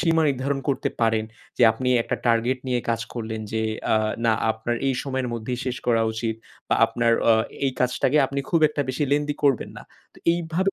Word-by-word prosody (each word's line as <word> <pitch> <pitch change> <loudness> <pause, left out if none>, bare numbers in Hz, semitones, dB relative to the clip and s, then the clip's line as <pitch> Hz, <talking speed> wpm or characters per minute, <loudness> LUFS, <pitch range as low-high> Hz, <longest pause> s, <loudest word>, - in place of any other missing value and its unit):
সীমা 165 -2 +3
নির্ধারণ 135 +1 -1
করতে 135 - 0
পারেন। 110 -1 +2 0.3
যে - - +3
আপনি 125 +2 -3
একটা - - -2
টার্গেট 120 +2 +2
নিয়ে 125 -1 +1
কাজ 115 -1 +1
করলেন। 110 -2 -4
যে 110 0 0 0.3
আ - - +5 0.3
না, 115 - +4 0.2
আপনার 110 +2 -2
এই 135 - +1
সময়ের 130 -2 -2
মধ্যেই 120 +2 -4
শেষ 125 -1 -2
করা 115 -2 +3
উচিত। 115 0 -2 0.3
বা - - +3
আপনার 115 -1 +1 0.2
আ - - +8 0.3
এই 130 - 0
কাজটাকে 125 +3 +1
আপনি 140 +1 -3
খুব 165 - +3
একটা 150 -1 -2
বেশি 130 +3 -1
lengthy 145 0 +1
করবেন 135 -5 +2
না। - - -9 0.3
তো - - -16
এইভাবে 170 +3 0
125 Hz, 195 wpm, -24 LUFS, 115-140 Hz, 0.3 s, আ